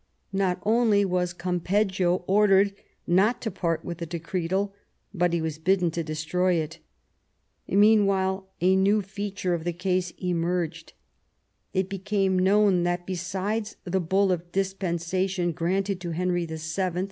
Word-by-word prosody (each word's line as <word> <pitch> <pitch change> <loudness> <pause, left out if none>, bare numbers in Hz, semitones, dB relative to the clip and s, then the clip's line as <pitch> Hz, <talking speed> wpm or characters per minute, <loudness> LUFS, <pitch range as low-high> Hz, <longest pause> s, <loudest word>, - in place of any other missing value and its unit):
Not 190 -2 +1
only 215 -2 +3
was 180 -1 0
Campeggio 180 +1 0
ordered 200 0 +4 0.3
not 195 +7 +3
to 220 - -2
part 165 -3 -2
with 170 -1 -5
the 170 - -4
decretal, 180 +4 -2 0.4
but 175 -2 +1
he 170 - +1
was 160 -1 -3
bidden 180 0 +2
to 170 - -2
destroy 160 +4 0
it. 160 -1 -3 0.9
Mean 210 +1 +5
while 190 0 0
a 185 +2 +4
new 200 +2 +3
feature 200 -2 -3
of 170 -2 -2
the 175 0 -2
case 180 0 -1
emerged. 170 -2 -2 0.8
It 190 0 +1
became 195 -1 0
known 195 -1 +4
that, 175 0 -1
besides 190 +4 -3
the 190 0 -1
bull 190 +3 +2
of 175 -1 -3
dispensation 185 -1 -1
granted 185 +3 -1
to 175 - -4
Henry 175 0 -1
VII. 160 0 -6
185 Hz, 140 wpm, -26 LUFS, 175-195 Hz, 0.9 s, Mean